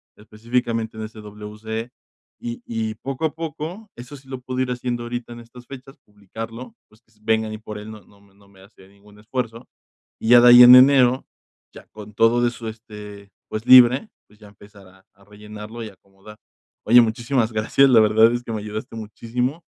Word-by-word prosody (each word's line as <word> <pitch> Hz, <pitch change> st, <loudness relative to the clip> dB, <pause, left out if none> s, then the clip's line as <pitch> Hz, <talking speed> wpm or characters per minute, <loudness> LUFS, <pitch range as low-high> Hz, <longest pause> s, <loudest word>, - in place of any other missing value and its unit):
específicamente 115 Hz, +1 st, -4 dB
en 110 Hz, -, -6 dB
ese 110 Hz, 0 st, -10 dB
WC, 105 Hz, +2 st, -8 dB, 0.5 s
y 240 Hz, 0 st, -7 dB
y 110 Hz, -1 st, -4 dB
poco 135 Hz, +6 st, -5 dB
a 155 Hz, -1 st, -3 dB
poco, 165 Hz, +6 st, -7 dB
eso 125 Hz, +4 st, -11 dB
sí 135 Hz, 0 st, -21 dB
lo 130 Hz, -1 st, -8 dB
puedo 130 Hz, 0 st, -6 dB
ir 130 Hz, -1 st, -2 dB
haciendo 120 Hz, -1 st, -4 dB
ahorita 120 Hz, 0 st, -7 dB
en 120 Hz, -, -11 dB
estas 120 Hz, +1 st, -16 dB
fechas, 135 Hz, +1 st, -12 dB
publicarlo, 115 Hz, +4 st, -10 dB
pues, 110 Hz, +1 st, -26 dB
que 115 Hz, -, -37 dB
s 110 Hz, -, -32 dB
vengan 110 Hz, 0 st, -1 dB
ahí 110 Hz, -, -6 dB
por 105 Hz, -1 st, -9 dB
él 105 Hz, +1 st, -10 dB
no 110 Hz, -1 st, -12 dB
no 100 Hz, +2 st, -24 dB
me 100 Hz, -1 st, -26 dB
no 100 Hz, 0 st, -25 dB
me 100 Hz, -1 st, -21 dB
hace 95 Hz, -1 st, -20 dB
ningún 100 Hz, +1 st, -21 dB
esfuerzo, 115 Hz, +1 st, -6 dB, 0.5 s
y 110 Hz, -, -4 dB
ya 120 Hz, 0 st, +8 dB
de 120 Hz, -, +7 dB
ahí 120 Hz, 0 st, +9 dB
en 125 Hz, +1 st, +10 dB
enero, 130 Hz, -1 st, +5 dB, 0.5 s
ya -, -, -14 dB
con 105 Hz, 0 st, -13 dB
todo 115 Hz, +3 st, +3 dB
de 120 Hz, -, +2 dB
su 120 Hz, -1 st, -9 dB
este, 105 Hz, -2 st, -11 dB, 0.2 s
pues, 110 Hz, +1 st, -6 dB
libre, 130 Hz, -, +6 dB, 0.2 s
pues, 105 Hz, +1 st, -25 dB
ya 105 Hz, -, -15 dB
empezar 100 Hz, -1 st, -18 dB
a 95 Hz, +1 st, -23 dB
a 100 Hz, -, -25 dB
rellenarlo 105 Hz, +2 st, -11 dB
y 110 Hz, -, -8 dB
acomodar. 100 Hz, +2 st, -18 dB, 0.5 s
Oye, 120 Hz, +3 st, +6 dB
muchísimas 115 Hz, +1 st, -1 dB
gracias, 110 Hz, +6 st, +2 dB
la 120 Hz, -3 st, +5 dB
verdad 110 Hz, +2 st, +4 dB
es 120 Hz, 0 st, -4 dB
que 115 Hz, -, -8 dB
me 110 Hz, -1 st, -4 dB
ayudaste 110 Hz, +2 st, -8 dB
muchísimo. 120 Hz, -, -5 dB
115 Hz, 205 wpm, -21 LUFS, 105-125 Hz, 0.5 s, en